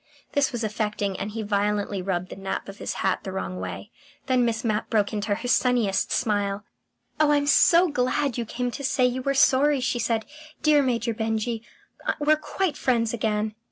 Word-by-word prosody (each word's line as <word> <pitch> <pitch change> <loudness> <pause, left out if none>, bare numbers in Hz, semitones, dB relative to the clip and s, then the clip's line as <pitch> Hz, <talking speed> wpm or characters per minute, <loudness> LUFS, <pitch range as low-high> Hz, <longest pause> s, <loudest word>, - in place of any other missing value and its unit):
This 285 -1 +2
was 240 -2 -3
affecting, 210 -2 -2
and 200 - -3
he 220 +1 -4
violently 205 -1 0
rubbed 180 -1 -2
the - - -6
nap 195 0 -4
of 195 +1 -10
his - - -4
hat 190 - +2
the 190 - -6
wrong 185 -1 -4
way.... 210 - -6 0.3
Then 255 -2 +2
Miss 230 0 -1
Mapp 215 -2 -1
broke 210 -1 +1
into 205 -1 -1
her 230 +4 -5
sunniest 245 -6 +2
smile. 205 -3 0 0.5
"Oh, 305 -1 +4
I'm 290 -1 +3
so 340 +5 +5
glad 275 -2 0
you 240 - -1
came 245 +2 -3
to 280 - -7
say 255 -1 +2
you 250 +1 0
were 275 +2 0
sorry!" 275 +1 +4
she 250 -1 -1
said. 225 -1 0 0.4
"Dear 300 -1 +5
Major 235 -3 0
Benjy, 220 +1 -2 0.6
we're 300 +1 +4
quite 310 +1 -2
friends 230 -3 +1
again." 215 -1 -1
230 Hz, 190 wpm, -25 LUFS, 210-260 Hz, 0.6 s, so